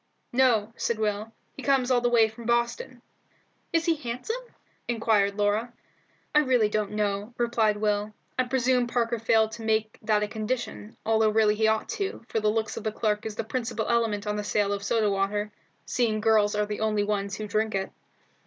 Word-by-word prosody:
"No," 235 -4 +3
said 235 - -1
Will; 215 0 -2 0.2
"he - - -8
comes 265 -2 +2
all 245 -1 +4
the 245 - +2
way 230 -2 +5
from 225 +1 -10
Boston." 235 - -1 0.7
"Is 330 0 +1
he 335 - +4
handsome?" 285 - -4 0.5
inquired 220 -4 +2
Laura. 210 +3 0 0.6
"I 300 - +6
really 250 -7 +3
don't 210 -1 -1
know," 210 +2 -2
replied 230 -3 +2
Will. 210 0 0 0.2
"I 255 - +1
presume 250 -1 +2
Parker 235 -1 0
failed 220 0 +3
to 230 - -8
make 220 0 0
that 215 -1 +2
a - - -1
condition, 210 - -4
although 220 0 +3
really 215 -1 +3
he 220 +1 +2
ought 220 0 +1
to, 395 - -3
for 225 - 0
the 215 0 +2
looks 220 0 -1
of 225 - -5
the 215 - -1
clerk 210 0 -1
is 215 - -6
the - - -2
principal 225 -1 -3
element 225 -3 +1
in 210 0 -1
the 210 - -2
sale 205 -1 +1
of 200 - -3
soda 215 0 +1
water, 205 +2 -1 0.3
seeing 225 -3 0
girls 215 -1 +3
are 210 0 +1
the 210 0 -5
only 215 -1 +1
ones 200 -1 -1
who 215 0 -5
drink 215 +1 0
it." 195 0 -2
220 Hz, 195 wpm, -27 LUFS, 210-235 Hz, 0.7 s, I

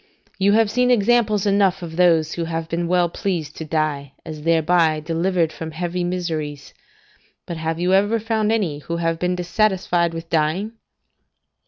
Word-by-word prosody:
you 200 +1 +3
have 220 -1 +3
seen 250 +1 +2
examples 225 -3 +3
enough 195 -2 +2
of 165 -1 -7
those 165 -3 +3
who 170 - -3
have 165 0 -3
been 170 +1 -2
well 175 0 +2
pleased 170 -4 -3
to - - -6
die, 150 -3 -2
as 155 -2 -7
thereby 165 0 +2
delivered 165 +1 0
from 160 - -6
heavy 175 +2 -3
miseries; 160 -5 -4 0.7
but 170 - -5
have 160 +1 -3
you 180 +2 +1
ever 205 +4 +3
found 220 -1 0
any 185 -10 0
who 170 +3 -4
have 165 -1 -1
been 180 +1 0
dissatisfied 180 -2 +1
with 165 0 -7
dying? 165 +6 0
170 Hz, 165 wpm, -21 LUFS, 160-195 Hz, 0.7 s, you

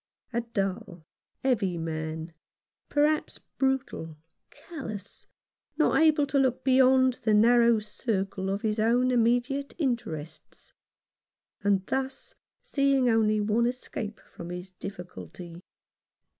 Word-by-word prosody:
A 235 - +1
dull, 195 -6 -4 0.4
heavy 200 -9 +1
man, 160 0 -4 0.6
perhaps, 300 +1 +1 0.2
brutal, 265 - -1 0.3
callous, 220 - -9 0.5
not - - +3
able 310 -2 +4
to 275 0 +1
look 260 -2 +1
beyond 260 -1 +4
the 215 -2 +3
narrow 235 +1 +5
circle 200 -3 -3
of 200 +1 -2
his 215 0 0
own 245 +3 +3
immediate 245 +4 +1
interests; 230 - -4 0.9
and 200 -2 +2
thus 265 +2 -3 0.3
seeing 275 -3 +2
only 215 -1 +3
one 220 +3 +2
escape 230 -3 -5
from 170 - -8
his 180 +1 -7
difficulty. 180 -2 -9
225 Hz, 105 wpm, -28 LUFS, 190-260 Hz, 0.9 s, narrow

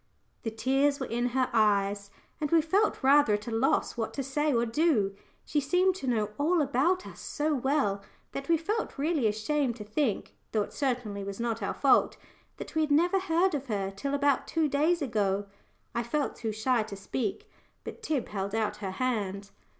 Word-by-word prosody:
The 225 - -2
tears 270 +5 +1
were 265 - -2
in 240 +1 -1
her 255 +1 +1
eyes, 200 -2 +2 0.3
and 295 - -1
we 330 - +5
felt 380 +5 +1
rather 275 -5 +5
at 210 +1 -6
a - - -3
loss 225 +4 +1
what 225 -2 -3
to 275 - -2
say 295 +3 0
or 235 -2 +2
do. 225 -6 +1 0.3
She 300 - 0
seemed 360 +7 +3
to 270 - -6
know 215 -4 0
all 330 +4 +3
about 295 +6 +1
us - - -10
so 305 +1 -1
well 265 -7 +1 0.3
that 275 +2 -6
we 335 - +5
felt 420 +8 -3
really 290 -4 +1
ashamed 235 +4 0
to 220 - -8
think 215 +1 -2 0.2
though 215 -2 +2
it - - -10
certainly 240 -7 -2
was 195 +1 -6
not 230 -1 -2
our 200 - -2
fault 275 - +3 0.4
that - - -8
we 315 - +1
had 305 - +1
never 350 +6 +4
heard 370 0 +2
of 280 -2 -3
her 200 -4 -2
till 280 +8 -2
about 285 -1 +2
two 320 -2 +1
days 305 +4 +2
ago. 205 -5 0 0.5
I 235 - 0
felt 275 +5 -1
too 225 -2 -3
shy 225 +3 +1
to 215 -2 -6
speak, 245 - -3 0.4
but - - -8
Tib 305 - -2
held 200 0 -3
out 220 -1 -1
her 195 -3 -5
hand. 200 -6 -2
260 Hz, 195 wpm, -29 LUFS, 215-300 Hz, 0.5 s, we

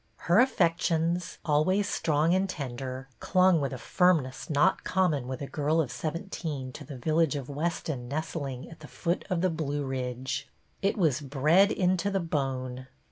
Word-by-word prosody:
Her 175 +4 +3
affections, 170 -6 +1
always 185 +7 +2
strong 155 0 +1
and 190 +1 +1
ten 135 -8 -4
der, 130 +1 -6
clung 185 -3 +4
with 140 - -1
a 130 - -4
firmness 155 -3 +1
not 155 +5 +3
common 160 -9 +1
with 130 +1 -4
a - - -2
girl 150 +3 0
of 140 -7 0
seventeen 155 -2 -4
to 145 - -9
the 140 -1 -8
village 155 +3 +2
of 140 -2 -5
Weston 145 -4 -3
nestling 140 -2 -4
at 165 - -12
the 150 - -11
foot 170 +3 -2
of 180 -3 0
the 185 -1 +2
Blue 145 -3 -2
Ridge. 130 +1 -3 0.3
It 195 +2 +1
was 155 -7 +2
bred 150 +8 +4
into 185 +1 +1
the 195 -1 0
bone 130 -6 -3
155 Hz, 170 wpm, -28 LUFS, 135-175 Hz, 0.3 s, clung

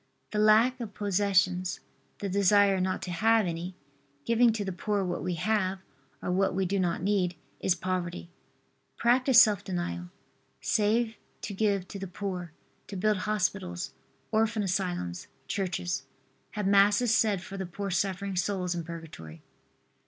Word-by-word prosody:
The 210 - -1
lack 220 +4 +5
of 220 -4 -6
possessions, 190 -2 +1 0.4
the 200 - -4
desire 200 0 +4
not 185 0 -1
to 180 - -4
have 220 +4 +3
any, 175 +1 -4 0.5
giving 235 0 +4
to 210 -2 -3
the 190 - -2
poor 200 +3 -1
what 175 -1 -3
we 180 -1 -2
have, 195 +1 0 0.5
or - - -1
what 190 0 +1
we 190 0 +1
do 195 +2 0
not 175 -2 0
need, 190 -3 +1 0.2
is 185 - +2
poverty. 180 -1 -3 0.7
Practice 250 +1 +5
self 210 -5 +5
denial. 90 - -4 0.5
Save 220 +2 +1 0.3
to 205 - -4
give 200 -2 0
to 200 - -7
the 195 - -5
poor, 180 -2 -5 0.4
to 200 - -7
build 210 +2 +2
hospitals, 185 - -1 0.4
orphan 220 0 +1
asylums, 180 - -2 0.2
churches. 180 -2 -2 0.5
Have 210 -2 -2
Masses 205 +4 +4
said 205 -5 +2
for 195 - -8
the 190 -2 -4
poor 195 +2 -5
suffering 195 +1 -1
souls 180 0 -1
in 170 -1 -3
Purgatory. 155 - -9
195 Hz, 150 wpm, -29 LUFS, 180-210 Hz, 0.7 s, lack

